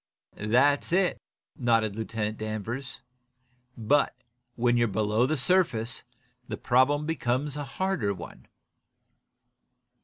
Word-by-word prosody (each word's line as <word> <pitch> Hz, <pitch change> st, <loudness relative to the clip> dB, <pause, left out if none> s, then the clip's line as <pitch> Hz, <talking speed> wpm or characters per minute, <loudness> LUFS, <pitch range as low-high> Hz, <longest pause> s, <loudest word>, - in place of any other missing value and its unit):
"That's 130 Hz, +9 st, +2 dB
it," 185 Hz, 0 st, +2 dB, 0.3 s
nodded 115 Hz, -4 st, +1 dB
Lieutenant 110 Hz, -1 st, -3 dB
Danvers. 110 Hz, +5 st, -5 dB, 0.8 s
"But, 130 Hz, +6 st, +2 dB, 0.4 s
when 120 Hz, 0 st, +2 dB
you're 120 Hz, -1 st, +3 dB
below 110 Hz, +3 st, +1 dB
the 155 Hz, +2 st, 0 dB
surface, 125 Hz, -7 st, +1 dB, 0.5 s
the -, -, -4 dB
problem 135 Hz, +4 st, +2 dB
becomes 145 Hz, -2 st, -1 dB
a 145 Hz, -, -3 dB
harder 140 Hz, -, -1 dB
one." 100 Hz, -, -9 dB
120 Hz, 100 wpm, -27 LUFS, 110-145 Hz, 0.8 s, you're